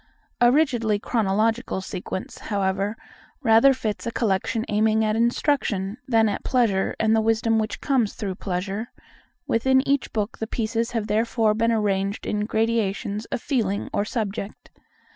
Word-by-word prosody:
A 240 0 +6
rigidly 240 -7 +2
chronological 220 +1 0
sequence, 185 0 -6
however, 200 0 0 0.5
rather 225 +5 +6
fits 225 -4 -3
a - - -1
collection 220 +1 0
aiming 220 +1 +2
at 215 0 +1
instruction 230 -4 0
than 225 -3 +4
at 205 - -3
pleasure, 225 -7 +1
and 220 0 +3
the 220 - +3
wisdom 225 0 +2
which 215 0 -3
comes 255 -7 +1
through 200 -4 -3
pleasure: 195 +5 -4 0.5
within 265 +3 +2
each 280 -1 +1
book 215 0 -3
the 220 - -3
pieces 230 0 -1
have 225 -3 -1
therefore 220 +1 +1
been 230 +2 +1
arranged 200 -2 0
in 210 0 -1
gradations 220 -1 -1
of - - -5
feeling 210 -8 -1
or 205 - +1
subject. 210 -1 -5
220 Hz, 145 wpm, -24 LUFS, 205-230 Hz, 0.5 s, A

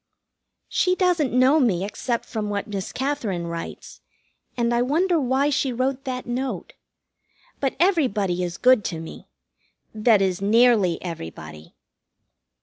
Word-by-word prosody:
She 365 0 +1
doesn't 355 -7 +1
know 255 +5 +4
me 195 - +1
except 235 +3 -3
from 215 -2 -4
what 205 -1 -2
Miss 200 -3 -5
Katherine 230 -11 -2
writes, 170 0 -7 0.6
and 235 0 +1
I 240 - +2
wonder 330 +7 +2
why 270 +3 +1
she 275 -2 0
wrote 260 +2 -2
that 255 -1 -4
note. 255 +2 -4 0.9
But 270 -2 -1
everybody 225 - +1
is 175 0 -3
good 255 -4 +4
to 165 - -3
me 160 - -10 0.7
that 220 0 +4
is, 190 -1 0
nearly 215 -4 +4
everybody. 80 - -8
235 Hz, 135 wpm, -23 LUFS, 190-270 Hz, 0.9 s, know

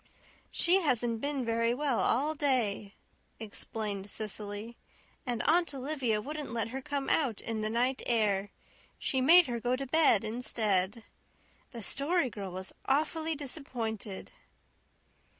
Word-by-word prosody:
"She 370 +3 +3
hasn't 240 -7 +1
been 280 -3 -2
very 230 +1 +1
well 275 -3 0
all 285 +6 +2
day," 240 -9 0 0.4
explained 205 -2 -4
Cecily, 210 +2 -4 0.5
"and 240 -2 -1
Aunt 340 +3 +3
Olivia 260 -5 -1
wouldn't 295 +3 -5
let 225 -2 -1
her 265 +3 -5
come 280 0 -3
out 260 -9 +1
in 225 -2 -3
the 215 - -1
night 250 +4 +1
air. 205 -4 +2 0.5
She 265 - 0
made 340 +6 +9
her 240 -3 -3
go 245 +2 +1
to 275 +1 -4
bed 270 -7 +4
instead. 215 -2 0 0.7
The 235 -3 -7
Story 280 - +1
Girl 195 -3 -6
was 185 +1 -6
awfully 315 +3 0
disappointed." 240 -8 -5
240 Hz, 135 wpm, -31 LUFS, 215-280 Hz, 0.7 s, made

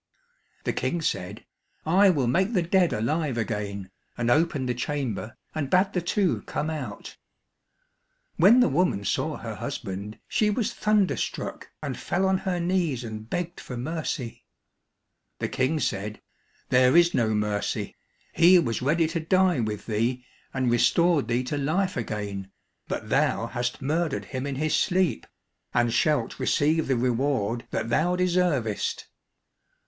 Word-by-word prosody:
The - - -1
King 175 - -1
said, 100 -3 -3 0.4
"I 190 +5 +5
will 145 -8 +2
make 190 - +1
the 180 -5 +2
dead 175 0 +3
alive 140 +4 -1
again," 100 -4 -3 0.3
and 120 0 +1
opened 150 -3 +2
the 125 - 0
chamber, 125 -4 -3 0.2
and 150 -4 -2
bade 185 +4 +3
the 180 - 0
two 185 +1 +1
come 155 +2 -2
out. 130 -10 -6 1.2
When 210 +9 +6
the - - +5
woman 140 - +1
saw - - -1
her - - -6
husband, 100 +3 -5
she 215 - +2
was 210 +1 -1
thunderstruck, 210 -3 -1
and - - -3
fell 185 +2 -1
on 190 0 +2
her 185 -2 -2
knees 170 -8 0
and 110 -1 -7
begged 175 0 -3
for 125 - -7
mercy. 135 -3 -4 0.9
The - - -2
King 135 +5 0
said, 105 -4 -2 0.5
"There 125 +4 +5
is 175 0 +5
no 110 -2 +1
mercy. 105 -1 -2 0.4
He 180 +2 +7
was 120 -10 0
ready 155 +6 +2
to 165 0 -2
die 185 -1 +2
with 105 -3 -3
thee 120 +3 -1 0.3
and 130 -3 0
restored 145 +7 +3
thee 120 +2 0
to 145 +3 -3
life 180 +7 0
again, 100 -4 -4 0.4
but - - -4
thou - - +2
hast 125 +2 -3
murdered 155 +1 -1
him 130 +1 -4
in 140 - -3
his 155 +2 0
sleep, 185 -2 +1 0.5
and 120 -1 +2
shalt 145 -3 +1
receive 150 +4 +2
the 135 -2 +1
reward 120 -2 0
that 110 - -2
thou 175 +8 +2
deservest." 175 - 0
140 Hz, 150 wpm, -26 LUFS, 115-175 Hz, 1.2 s, He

